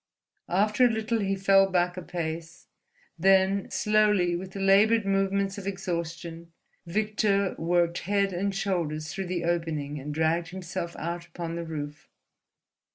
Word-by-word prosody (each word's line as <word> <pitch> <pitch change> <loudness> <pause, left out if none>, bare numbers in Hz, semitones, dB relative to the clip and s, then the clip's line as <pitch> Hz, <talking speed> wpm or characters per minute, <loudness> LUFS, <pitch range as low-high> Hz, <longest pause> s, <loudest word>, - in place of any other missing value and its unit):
After 210 +6 +2
a - - +5
little 220 0 -1
he 195 -1 0
fell 195 0 +4
back 180 -1 +1
a 185 - -5
pace. 165 -1 -5 0.5
Then 195 +2 +3
slowly, 210 -4 +2
with 185 +2 -6
the 200 - -6
laboured 205 +3 +4
movements 195 0 0
of 195 - -7
exhaustion, 170 -3 -4 0.4
Victor 205 0 +1
worked 170 0 +1
head 200 0 0
and 195 +2 -1
shoulders 165 -6 -2
through 195 -1 -4
the 175 -1 -2
opening 160 -4 -2
and 145 +2 -6
dragged 160 +2 +1
himself 180 -1 -5
out 170 +1 -4
upon 170 -1 -5
the 170 0 -4
roof. 150 -2 -6
180 Hz, 145 wpm, -27 LUFS, 170-195 Hz, 0.5 s, a